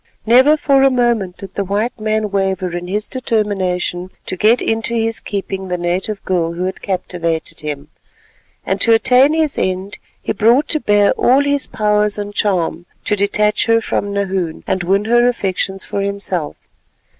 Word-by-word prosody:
Never 260 +7 +5
for 275 -2 +3
a 270 - +6
moment 235 -8 0
did 195 - -9
the 200 - -1
white 210 +5 -2
man 215 -1 -1
waver 190 -2 -1
in 175 0 -5
his 210 +3 -2
determination 190 -7 -1 0.2
to - - -4
get 220 +6 +3
into 225 +1 -1
his 225 0 0
keeping 195 -1 -4
the 180 -1 -2
native 180 +4 -2
girl 170 -3 0
who 175 +2 -4
had 185 +1 -4
captivated 170 -4 -3
him, 145 -1 -5 0.8
and 190 0 -1
to 230 0 +5
attain 255 +4 +4
his 315 -3 0
end 185 +2 -2 0.2
he - - -3
brought 235 +8 +3
to 310 - +2
bear 205 -5 +3
all 260 +3 +3
his 285 -1 0
powers 210 0 +1
and 205 0 -5
charm 175 -4 -1 0.2
to 210 - +2
detach 210 +2 +1
her 230 0 +4
from 205 -2 -2
Nahoon, 190 -4 -2
and 190 - -1
win 195 +4 +1
her 240 +2 +4
affections 195 -4 -2
for 200 - -3
himself. 195 -5 -3
200 Hz, 170 wpm, -17 LUFS, 185-225 Hz, 0.8 s, a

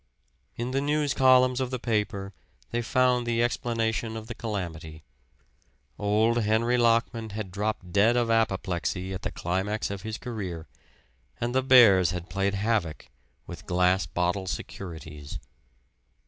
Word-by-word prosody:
In 120 +2 -3
the 135 +1 0
news 145 0 +1
columns 130 -1 +4
of 130 - -1
the 130 - -2
paper 105 -4 -2 0.4
they 120 - 0
found 125 0 +2
the 115 0 +1
explanation 115 -2 -1
of 110 - -7
the 120 - -6
calamity 85 -9 -6 1.0
old 110 +3 +2
Henry 110 +3 +2
Lockman 115 -1 +1
had 105 -2 -6
dropped 100 -2 -3
dead 110 +4 +4
of 120 -1 +1
apoplexy 95 -4 -1
at 95 - -5
the - - -3
climax 95 +5 -2
of 100 -1 -5
his 110 0 -5
career, 95 -9 -6 0.7
and 120 +1 -2
the 130 - +3
bears 115 -9 +6
had 90 -1 -5
played 100 +1 0
havoc 100 -6 -1 0.4
with - - -10
"Glass 90 0 +2
Bottle 90 +3 -1
Securities." 80 -6 -7
110 Hz, 140 wpm, -27 LUFS, 95-120 Hz, 1.0 s, bears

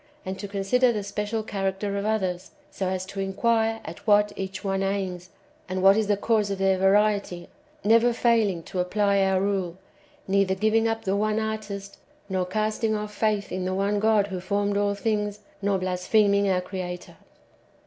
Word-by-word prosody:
and 190 0 -5
to 205 - -5
consider 200 +6 +2
the 210 -3 -3
special 210 +2 -3
character 195 -1 -2
of 200 +1 -2
others, 190 -4 -1 0.2
so 190 - -3
as 185 0 -2
to 195 +1 -8
inquire 225 +3 +1
at - - -9
what 205 0 +4
each 190 0 -5
one 195 -1 -1
aims, 190 -2 -2 0.4
and 185 0 -2
what 195 +1 +7
is 220 -1 +1
the 205 -1 +2
cause 210 -1 +1
of 195 - -2
their 195 0 +2
variety, 200 -2 +2 0.4
never 230 +3 +5
faihng 225 -7 +1
to 185 - -5
apply 200 +2 +2
our 190 -1 +2
rule, 190 -3 -1 0.5
neither 195 0 +2
giving 220 +3 +2
up 225 0 -2
the 190 - -1
[one^] 215 +1 +1
artist, 210 -2 -5 0.3
nor 185 -1 -1
castino; 215 +2 0
off 210 0 -8
faith 210 -1 0
in 185 - -2
the 185 0 -1
one 200 +1 0
God 215 -1 +3
who 190 -2 -5
formed 200 +2 -1
all 205 0 +1
things, 210 -1 -2 0.2
nor 200 -1 +1
blaspheming 200 +2 +2
our 185 -1 +2
Creator. 180 -1 -6
200 Hz, 180 wpm, -25 LUFS, 190-215 Hz, 0.5 s, what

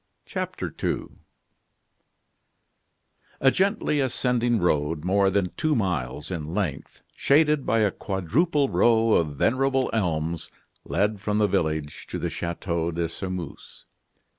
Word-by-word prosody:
CHAPTER - - -4
II - - -2 2.2
A 135 - +5
gently 195 -5 +1
ascending 125 -2 +1
road, 80 -3 0
more 100 +1 +3
than 95 -2 0
two 155 -2 +1
miles 75 - -2
in 80 -1 -4
length, 85 -10 -3
shaded 150 -1 +3
by 115 - +3
a 105 -2 +3
quadruple 135 - 0
row 115 -3 +3
of 75 -4 +1
venerable 135 - +2
elms, 85 -6 -1 0.4
led 105 +1 0
from 105 0 0
the 105 - +4
village 80 -5 -1
to - - -4
the - - -3
Chateau 85 -1 -2
de 85 0 -1
Sairmeuse. 90 -2 -7
100 Hz, 120 wpm, -25 LUFS, 85-125 Hz, 2.2 s, A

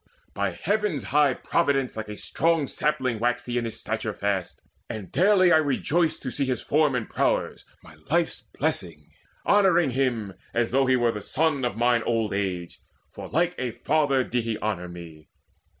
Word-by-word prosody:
By 100 -2 -1
Heaven's 200 - -1
high 145 -1 +3
providence 135 -2 0
Like 110 -1 -5
a 105 - -6
strong 165 -3 0
sapling 130 -7 -1
waxed 120 +1 0
he 120 0 -1
in 115 -1 -3
stature 110 -1 -4
fast, 100 -3 -2 0.3
And 105 -5 -6
daily 185 +3 +4
I - - +7
rejoiced 155 +3 0
to 130 - -3
see 140 +1 0
his 125 -3 -1
form 150 -2 +2
And 120 -3 -2
prowess, - - -1 0.2
my 80 - -14 0.2
life's 170 +2 +1 0.2
blessing, 90 - -2 0.3
honouring 180 -8 +4
him 120 -6 -1 0.2
As 120 0 +1
though 135 +1 +3
he 130 - +4
were 120 -2 +2
the 105 - -6
son 150 +3 0
of 120 -2 -1
mine 120 0 +3
old 115 -2 0
age; 90 -4 -3 0.3
For - - -8
like 175 +2 +1
a 130 - -1
father 140 +2 +1
did 125 -1 -1
he 115 -1 -2
honour 95 -4 -3
me. 85 -3 -11
125 Hz, 175 wpm, -25 LUFS, 110-150 Hz, 0.3 s, I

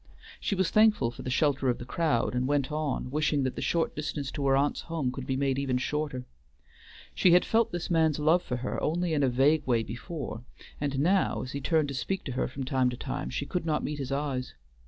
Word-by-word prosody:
She 200 - -1
was 190 -2 +1
thankful 215 - +4
for - - -10
the - - -4
shelter 140 -1 +2
of 120 - +1
the 120 - -8
crowd, 150 -5 0
and 125 +1 0
went 145 0 +1
on, 150 -4 -2
wishing 150 -1 +1
that 130 - -1
the - - -4
short 170 -1 0
distance 145 -2 -3
to 140 -2 -2
her 135 0 +4
aunt's 145 +1 +1
home 160 -6 -2
could 130 0 -7
be 130 - 0
made 135 -1 +1
even 135 -2 0
shorter. 135 -1 -2 0.9
She 180 - +4
had 180 - +5
felt 225 0 +2
this 175 +1 -4
man's 160 -3 +3
love 160 +4 +3
for 125 - -3
her 125 - -3
only 170 +1 0
in 150 - +2
a 135 - +3
vague 140 +4 +3
way 115 -3 +2
before, 120 +1 -6 0.4
and 140 -2 -1
now, 180 +7 +2
as 130 - -6
he 140 - -4
turned 155 0 +2
to - - -4
speak 190 +8 -2
to 135 - -5
her 125 - -1
from 135 +1 -6
time 130 -1 +1
to 125 - -5
time, - - -4
she 140 - -3
could 180 +3 -2
not 155 -2 0
meet 150 -1 -3
his 135 -1 -4
eyes. 135 - -2
140 Hz, 240 wpm, -28 LUFS, 130-160 Hz, 0.9 s, had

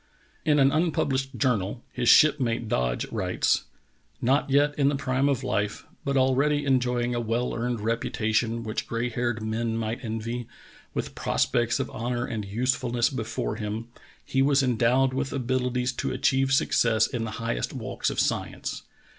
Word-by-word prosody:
In 150 -2 +4
an 135 -1 +5
unpublished 140 -5 0
journal 115 -1 0
his 120 -2 +1
shipmate 125 -7 +4
Dodge 60 - 0
writes: - - 0 0.5
"Not 135 +4 +2
yet 145 +2 +3
in 140 -1 +3
the 145 - 0
prime 135 0 +1
of 135 -2 0
life, 105 -4 -1 0.2
but 140 0 0
already 140 +3 +2
enjoying 125 -2 +1
a 120 - -1
well 120 +2 -1
earned 120 -1 -2
reputation 115 +1 0
which 110 -1 -3
gray 115 +1 -1
haired 120 -2 -2
men 115 +1 -1
might 115 +3 -3
envy, 115 +1 -4 0.5
with - - -3
prospects 120 0 +1
of - - -3
honor 120 +2 -2
and 110 -4 -4
usefulness 120 +3 0
before 115 -3 -3
him, 110 +2 -4 0.4
he 135 - +1
was 140 0 +4
endowed 125 +2 +2
with 135 +1 -2
abilities 125 -1 -1
to - - -2
achieve 135 +1 +1
success 115 -4 +3
in 120 -1 -3
the 110 - -4
highest - - -2
walks - - -3
of - - -3
science. - - -2
120 Hz, 155 wpm, -26 LUFS, 115-135 Hz, 0.5 s, an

